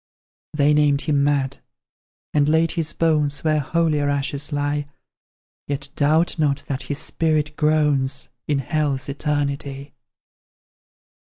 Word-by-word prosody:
They 150 0 +4
named 145 -1 +3
him 145 -3 +1
mad, 140 -2 0 0.7
and 145 0 +3
laid 160 +1 +3
his 165 -2 -1
bones 150 -3 +1
Where 155 -1 +2
holier 150 -1 +1
ashes 140 +1 -2
lie; 145 0 -1 0.8
Yet 140 0 -4
doubt 155 +4 +2
not 145 -2 +1
that 135 -1 -3
his 145 - -4
spirit 155 -1 0
groans 150 -4 +1 0.2
In 145 - +1
hell's 140 -1 -1
eternity. 140 -1 -3
145 Hz, 115 wpm, -22 LUFS, 140-155 Hz, 0.8 s, They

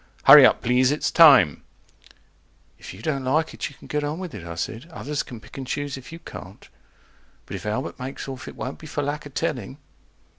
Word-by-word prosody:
HURRY 135 -1 +10
UP - - 0
PLEASE 125 +1 +3
ITS 145 +2 -1
TIME 140 - +6 1.2
If - - -9
you 95 +5 -12
don't 140 -4 -2
like 155 +5 0
it - - -4
you 140 - -16
can - - -17
get 150 0 -2
on 150 +2 -3
with 180 -3 -7
it, 100 - -8
I 85 - -6
said, 115 - -5
Others 150 -3 -4
can 120 - -9
pick 125 - -12
and 130 - -6
choose 145 +1 -3
if 130 +1 -11
you 165 - -8
can't. 100 - -11 0.8
But - - -7
if - - -7
Albert 110 +7 -3
makes 130 +2 -6
off, 130 -1 -7
it - - -9
won't 130 - -6
be 155 - -11
for 145 0 -3
lack 145 +1 -4
of 140 - -18
telling. 130 0 -3
135 Hz, 220 wpm, -23 LUFS, 125-150 Hz, 1.2 s, HURRY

